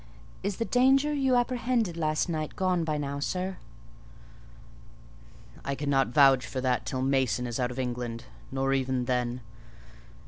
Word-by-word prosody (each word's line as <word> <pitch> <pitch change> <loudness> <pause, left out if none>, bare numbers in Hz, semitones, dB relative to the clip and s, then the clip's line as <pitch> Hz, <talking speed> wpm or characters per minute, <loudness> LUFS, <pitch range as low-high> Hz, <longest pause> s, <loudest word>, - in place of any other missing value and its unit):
"Is 200 0 -2
the 230 - -1
danger 270 +5 +3
you 265 -3 +2
apprehended 245 -5 0
last 155 -1 0
night 155 -3 -3
gone 185 -2 +1
by 155 -2 -1
now, 140 -1 -3
sir?" 185 +5 -2 2.1
"I 140 - -2
cannot 140 -1 +1
vouch 135 0 +5
for 130 - -4
that 130 -1 0
till 130 -1 -2
Mason 130 -2 +1
is 120 0 -3
out 125 -1 +1
of 125 - -8
England: 120 -2 -3 0.3
nor 135 0 0
even 130 -2 0
then. 125 0 -1
140 Hz, 145 wpm, -28 LUFS, 130-185 Hz, 2.1 s, vouch